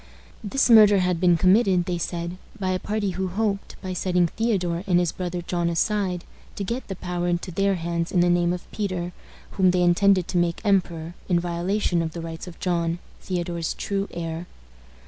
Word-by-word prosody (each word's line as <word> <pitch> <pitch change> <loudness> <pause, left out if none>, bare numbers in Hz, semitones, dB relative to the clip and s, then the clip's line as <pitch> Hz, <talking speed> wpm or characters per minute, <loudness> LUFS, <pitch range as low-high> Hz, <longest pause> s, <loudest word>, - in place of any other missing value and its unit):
This 240 +6 +1
murder 215 -4 +8
had 180 -2 +1
been 175 -1 +4
committed, 185 0 +4
they 175 -1 -2
said, 170 +1 -3 0.2
by 185 -1 0
a 185 - 0
party 210 -1 -1
who 185 +1 -2
hoped, 200 +1 -2
by 185 -1 -3
setting 180 -1 +2
Theodore 180 -3 -1
and 180 -2 +4
his 175 -2 +1
brother 180 -1 -4
John 175 0 -1
aside, 185 0 0 0.3
to 200 - -3
get 235 +7 -4
the 195 - -4
power 175 -1 -3
into 175 +1 -1
their 195 +2 +1
hands 170 0 -2
in 180 - +3
the 175 - +4
name 175 0 +3
of 180 0 -4
Peter, 185 -4 -3 0.4
whom 190 -2 +3
they 180 0 +2
intended 185 +1 +4
to 180 - +1
make 170 -1 0
emperor, 175 -4 +1 0.2
in 175 -1 +3
violation 175 +1 0
of 160 -1 -3
the 170 - -5
rights 165 +1 -7
of 175 - -10
John, 170 -2 0 0.2
Theodore's 175 -2 -3
true 200 0 -2
heir. 165 0 -5
180 Hz, 190 wpm, -24 LUFS, 170-195 Hz, 0.4 s, murder